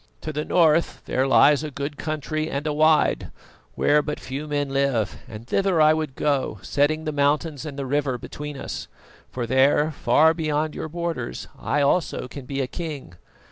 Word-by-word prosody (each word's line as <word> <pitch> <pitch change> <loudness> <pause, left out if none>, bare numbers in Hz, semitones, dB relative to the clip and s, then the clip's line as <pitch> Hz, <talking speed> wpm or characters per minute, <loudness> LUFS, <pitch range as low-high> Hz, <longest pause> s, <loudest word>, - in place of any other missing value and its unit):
To 155 - -5
the 150 +1 -2
north 165 -1 +2
there 130 +1 0
lies 145 +2 +5
a 155 - -3
good 140 +1 -5
country 155 +1 -3
and 140 0 -3
a 150 - 0
wide, 155 +1 +3 0.5
where 150 +1 +3
but 150 0 -4
few 140 +3 -6
men 145 -1 -1
live, 135 -6 0
and 110 +1 -9
thither 190 +4 +1
I 155 0 +6
would 155 -4 -3
go, 140 -6 0
setting 150 +2 +1
the 155 - -2
mountains 145 +1 0
and 145 -2 -7
the 140 - -3
river 135 -1 0
between 150 +4 -7
us; - - -6 0.4
for 125 -2 -4
there, 135 +5 +3
far 160 +2 +4
beyond 155 -1 -1
your 160 - -5
borders, 170 -7 -4
I 140 +1 0
also 140 -3 0
can 130 0 -9
be 140 -1 -2
a 130 - -1
king. 150 - -6
145 Hz, 180 wpm, -24 LUFS, 135-155 Hz, 0.5 s, I